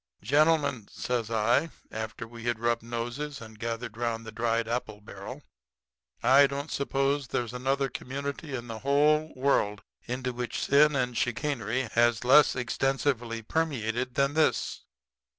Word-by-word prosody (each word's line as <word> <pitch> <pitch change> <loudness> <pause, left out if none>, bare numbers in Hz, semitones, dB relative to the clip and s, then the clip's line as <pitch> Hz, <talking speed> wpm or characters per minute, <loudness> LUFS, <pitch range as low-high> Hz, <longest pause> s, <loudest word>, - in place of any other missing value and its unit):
"'Gentlemen,' 145 -2 +2
says 120 -3 -2
I, 120 +8 +2 0.2
after 110 +1 -5
we 115 0 -10
had 120 -1 0
rubbed 120 0 +1
noses 120 +5 -4
and 110 -2 -12
gathered 115 -1 -4
'round 115 -1 -2
the 110 - -7
dried 115 0 0
apple 115 -3 -3
barrel. 105 - -9 0.8
'I 140 +2 +7
don't 140 +2 -5
suppose 140 0 0
there's 120 0 -2
another 135 +2 0
community 140 +3 -5
in 120 -1 -5
the 115 -2 -6
whole 150 +3 +3
world 120 -6 +1 0.2
into 125 +1 -3
which 120 0 -3
sin 150 +1 +4
and 125 -2 0
chicanery 125 0 -1
has 120 0 +2
less 140 +3 +6
extensively 125 -2 -1
permeated 125 -4 -1
than 140 +1 +2
this. 155 0 +1
125 Hz, 140 wpm, -28 LUFS, 115-140 Hz, 0.8 s, I